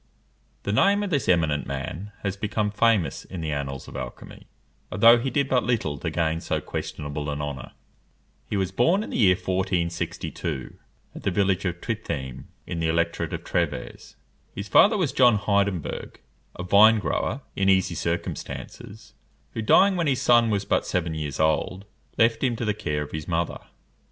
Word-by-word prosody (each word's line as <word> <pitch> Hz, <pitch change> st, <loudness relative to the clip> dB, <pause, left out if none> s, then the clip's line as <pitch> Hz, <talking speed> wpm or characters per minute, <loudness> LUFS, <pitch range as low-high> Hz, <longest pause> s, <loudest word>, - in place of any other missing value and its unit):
The 100 Hz, -, -2 dB
name 200 Hz, -, +3 dB
of 200 Hz, -, -3 dB
this 140 Hz, -7 st, 0 dB
eminent 80 Hz, -6 st, +2 dB
man 70 Hz, +9 st, -5 dB
has 100 Hz, -2 st, -1 dB
become 105 Hz, 0 st, -1 dB
famous 105 Hz, -4 st, +1 dB
in 95 Hz, -, -8 dB
the 80 Hz, -2 st, -3 dB
annals 70 Hz, -2 st, -4 dB
of -, -, -11 dB
alchymy, 65 Hz, -2 st, -8 dB, 0.4 s
although 115 Hz, +5 st, +6 dB
he 135 Hz, +3 st, -2 dB
did 140 Hz, 0 st, 0 dB
but 125 Hz, -2 st, +2 dB
little 90 Hz, -, -1 dB
to -, -, -2 dB
gain 80 Hz, -1 st, -1 dB
so -, -, -1 dB
questionable 75 Hz, 0 st, -5 dB
an 75 Hz, 0 st, -3 dB
honour. 70 Hz, -4 st, -5 dB, 0.8 s
He 105 Hz, -, -1 dB
was 95 Hz, -1 st, -1 dB
born 165 Hz, -, +2 dB
in -, -, -8 dB
the -, -, -2 dB
year 95 Hz, -5 st, +5 dB
1462, 90 Hz, -5 st, -3 dB, 0.4 s
at -, -, -9 dB
the -, -, 0 dB
village 95 Hz, 0 st, +1 dB
of 90 Hz, -1 st, -3 dB
Trittheim, 65 Hz, -, -4 dB, 0.2 s
in 85 Hz, -, -4 dB
the 80 Hz, -, 0 dB
electorate 85 Hz, +1 st, 0 dB
of -, -, -5 dB
Trèves. 65 Hz, -, -3 dB, 0.4 s
His 100 Hz, +1 st, -5 dB
father 210 Hz, -, +5 dB
was 170 Hz, -9 st, 0 dB
John 125 Hz, -4 st, +5 dB
Heidenberg, 100 Hz, -4 st, -1 dB, 0.4 s
a 90 Hz, -, -5 dB
vine 105 Hz, +5 st, +6 dB
grower, 105 Hz, -, -2 dB
in 95 Hz, 0 st, +2 dB
easy 95 Hz, -2 st, +3 dB
circumstances, 85 Hz, +5 st, -5 dB, 0.4 s
who, 115 Hz, -, -3 dB
dying 190 Hz, -, +5 dB
when 170 Hz, -3 st, 0 dB
his 135 Hz, -2 st, +1 dB
son 120 Hz, -2 st, +5 dB
was 100 Hz, -2 st, 0 dB
but -, -, +1 dB
seven 85 Hz, -3 st, -1 dB
years 75 Hz, -3 st, -4 dB
old, 80 Hz, +5 st, 0 dB, 0.3 s
left 115 Hz, +2 st, +3 dB
him 125 Hz, -3 st, +1 dB
to 115 Hz, -, -3 dB
the 105 Hz, -, +1 dB
care 75 Hz, -7 st, -2 dB
of 75 Hz, -, -10 dB
his 80 Hz, -1 st, -5 dB
mother. 85 Hz, 0 st, -1 dB
95 Hz, 175 wpm, -25 LUFS, 80-115 Hz, 0.8 s, although